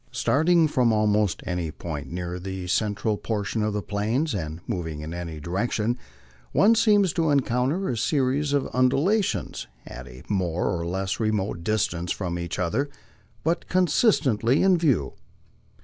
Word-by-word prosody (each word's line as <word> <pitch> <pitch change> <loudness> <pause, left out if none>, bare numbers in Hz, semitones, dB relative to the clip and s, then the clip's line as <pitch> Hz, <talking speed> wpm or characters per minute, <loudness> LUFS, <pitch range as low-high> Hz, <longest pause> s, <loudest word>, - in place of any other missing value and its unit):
Starting 160 +2 +3
from 125 -5 +2
almost 105 -2 +1
any 90 -2 -2
point 75 -1 -6
near 90 0 -4
the 95 0 -5
cen 105 +3 0
tral 105 0 -1
portion 110 0 -2
of 105 0 0
the 105 -1 -3
Plains, 110 +10 -1
and 80 -4 -4
moving 80 -4 -4
in 80 +2 -6
any 85 -3 -5
direction, 105 +7 -1 0.6
one 215 +3 +5
seems 205 -5 +4
to 165 -2 +1
encounter 140 +6 +1
a 125 - -1
series 140 +2 +1
of 140 -1 +1
undulations 135 - +1 0.2
at - - -9
a 60 +1 -12
more 90 -2 0
or 85 0 -3
less 95 +3 -2
remote 105 -5 -1
distance 90 -4 -1
from 85 -3 -3
each 85 -1 -4
other, 95 +12 0 0.5
but 165 +3 0
constantly 150 - +3
in 190 -1 +5
view. 135 - +1
105 Hz, 150 wpm, -25 LUFS, 90-140 Hz, 0.6 s, one